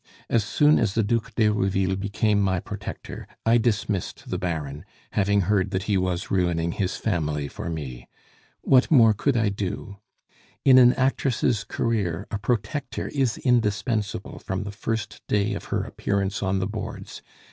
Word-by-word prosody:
As 115 -3 +3
soon 150 +8 +4
as 110 -4 0
the 115 - +3
Duc 115 +1 -1
d'Herouville 95 -3 +2
became 100 +1 +1
my 95 -2 +1
protector, - - -7 0.2
I 115 +1 +5
dismissed 105 -4 -2
the - - -1
Baron, 80 -4 -3 0.3
having 100 0 +2
heard 95 +1 +1
that 95 0 -2
he 105 -1 0
was 90 -1 -1
ruining 85 -3 +1
his 95 +1 -2
family 75 -8 -1
for 80 - -6
me. 70 -7 -6 0.5
What 130 -1 +4
more 115 -8 +6
could 125 +5 0
I 110 -2 +2
do? 100 0 -5 0.7
In 130 -2 +8
an 125 0 +7
actress' 130 -4 +1
career 100 -4 -1
a 105 - -2
protector 125 +5 -2
is 135 -6 +1
indispensable 110 -4 0
from 95 -1 -3
the 100 - -5
first 110 +1 -4
day 105 +1 +1
of 100 - -5
her - - -1
appearance 100 0 -2
on 95 0 0
the 95 - 0
boards. 105 +1 -6
100 Hz, 160 wpm, -25 LUFS, 95-115 Hz, 0.7 s, In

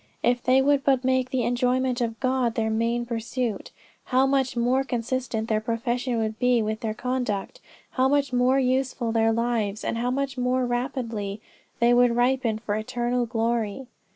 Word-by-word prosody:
If 245 0 +2
they 260 +2 +4
would 285 0 +3
but 270 -2 +2
make 260 0 +1
the 255 -1 0
enjoyment 250 +1 0
of 225 -1 -2
God 255 -3 0
their 220 -1 0
main 230 +2 0
pursuit 235 -1 -3 0.4
how 260 +1 +3
much 270 -2 0
more 250 +3 +2
consistent 245 -3 -2
their 215 -1 0
profession 240 +2 -1
would 220 -1 -2
be 250 -1 +3
with 215 0 -2
their 220 -1 -3
conduct, 250 - -3 0.3
how 260 0 +2
much 280 -1 +1
more 250 +2 +3
useful 255 -2 0
their 225 0 +2
lives 225 -3 -1
and 230 - -2
how 245 +1 0
much 270 0 -2
more 250 +1 +1
rapidly 240 -5 -3 0.4
they 240 0 +4
would 245 -1 +4
ripen 245 -2 +1
for 220 -2 -4
eternal 240 +2 -1
glory." 230 +1 -1
245 Hz, 170 wpm, -25 LUFS, 230-255 Hz, 0.4 s, they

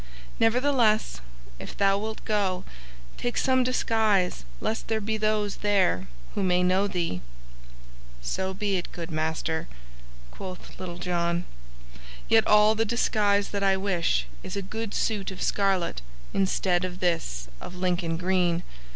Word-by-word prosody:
Nevertheless, 225 - +3 0.4
if - - -8
thou 195 0 +4
wilt 220 +1 -5
go, 195 -4 0 0.5
take 245 - -2
some 260 -1 +3
disguise 220 - +1
lest 225 - -2
there 220 -1 +1
be 220 +1 -1
those 215 -1 0
there 195 - +2 0.3
who - - -1
may 180 -1 +3
know 185 +3 +3
thee." 170 - -2 1.0
"So 190 - -2
be 200 0 0
it, 175 - -5
good 170 -1 -6
master," 160 +1 -1 0.6
quoth 185 -2 -9
Little 175 -2 -5
John, 175 -1 0 0.8
"yet - - +5
all 210 +1 +6
the 220 +1 +1
disguise 205 -3 +2
that 200 - -2
I 195 -1 +3
wish 175 - +1 0.2
is - - -6
a 200 - -2
good 220 +2 -4
suit 210 -4 0
of 190 - -5
scarlet 190 - +1 0.3
instead 185 -2 +2
of 180 0 -4
this - - -1
of 180 - -8
Lincoln 175 -2 0
green. 180 -1 +1
190 Hz, 140 wpm, -27 LUFS, 175-210 Hz, 1.0 s, all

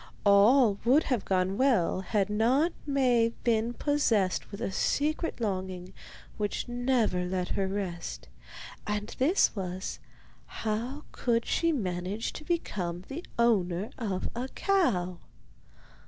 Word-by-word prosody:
All 205 +2 +5
would 265 +7 +5
have 250 -6 -1
gone 190 +2 0
well 235 -9 +2
had 195 0 0
not 245 +11 +2
Maie 245 -5 +3
been 230 0 +1
possessed 230 -11 +1
with 200 - -8
a - - -2
secret 305 - 0
longing 185 -3 -3 0.4
which 205 -1 -2
never 240 -6 +1
let 180 0 -2
her 195 -1 0
rest; 190 -3 -4 0.6
and 210 0 -3
this 305 +4 +3
was, 185 -1 -4 0.5
how 235 +7 -3 0.4
she 335 - +1
could 295 - 0
manage 185 +3 -3
to - - -8
become 185 - -2
the 315 +6 -5
owner 205 -3 +2
of 195 -6 -2
a 245 +2 -3
cow. 200 - +1
215 Hz, 125 wpm, -29 LUFS, 190-255 Hz, 0.6 s, All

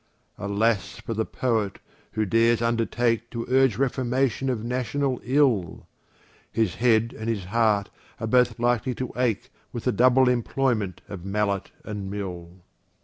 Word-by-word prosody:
Alas 100 +1 0
for 115 - -4
the 110 0 -1
Poet, 110 -6 -1 0.4
who 110 0 0
dares 115 +3 +3
undertake 115 0 0
To 115 -1 -4
urge 130 -4 +3
reformation 130 0 0
of 115 -4 -2
national 125 +2 -1
ill! 125 - +1 0.7
His 110 -6 +1
head 115 0 +2
and 110 +1 -4
his 105 -4 -1
heart 105 0 +1 0.3
are 115 - -2
both 125 0 +3
likely 120 +1 +1
to 130 - -4
ache 125 0 -1 0.2
With 120 - -5
the 125 - +2
double 130 +2 +4
employment 120 -5 0
of 95 -4 -8
mallet 100 0 -1 0.2
and 105 -3 -5
mill. 90 -3 -6
115 Hz, 145 wpm, -25 LUFS, 105-125 Hz, 0.7 s, double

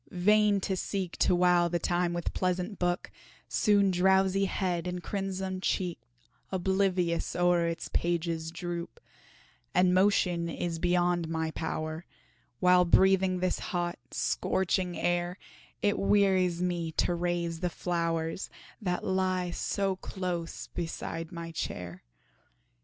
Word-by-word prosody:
vain 210 +2 +3
to 190 0 -1
seek 185 -1 -3
To 180 - +3
while 175 -1 +4
the 175 - 0
time 175 0 0
with 175 -1 -3
pleasant 185 +2 -1
book, 175 0 -1 0.4
Soon 200 -2 +3
drowsy 190 +1 +3
head 180 -3 -1
and 180 -1 -4
crimsoned 190 -1 -3
cheek 180 -2 -1 0.5
Oblivious 190 -2 0
o'er 175 -1 +3
its 165 0 -3
pages 170 -1 -1
droop 175 0 -5 0.8
And 180 0 +4
motion 180 -3 +2
is 165 0 -3
beyond 175 -1 +1
my 160 -1 -1
power, 160 0 -4 0.6
While 180 -1 +5
breathing 190 +1 +4
this 185 - 0
hot, 175 -1 -3
scorching 185 -1 0
air, 175 +1 0 0.5
It 205 0 +2
wearies 190 -3 +3
me 175 -2 -1
to 175 - +1
raise 170 -1 -1
the 180 0 0
flowers, 165 0 -2 0.3
That 180 -3 -1
lie 185 -1 0
so 195 +2 -1
close 180 -3 -4
beside 165 -1 -5
my 170 -1 -6
chair. 90 - -5
180 Hz, 125 wpm, -29 LUFS, 170-190 Hz, 0.8 s, While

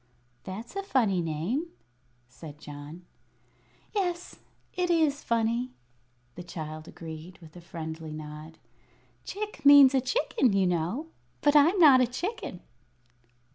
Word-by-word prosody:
"That's 210 - -8
a 395 - -1
funny 230 - +1
name," 170 - -2 0.6
said 145 +4 -11
John. 150 +4 -10 0.9
"Yes, 360 -4 -2 0.3
it 360 -1 -1
is 315 -4 +2
funny," 235 +2 0 0.6
the 175 - -9
child 155 -2 -7
agreed, 165 +2 -9
with 160 -2 -16
a 175 - -10
friendly 160 -2 -7
nod. 155 +1 -9 0.7
"Chick 420 +1 -6
means 285 -1 +9
a 265 - +3
chicken, 260 - +1
you 195 -1 +3
know. 180 - -1 0.3
But 290 0 +3
I'm 315 +7 +6
not 285 -7 +7
a 250 - +3
chicken." 345 - -5
210 Hz, 125 wpm, -28 LUFS, -, 0.9 s, means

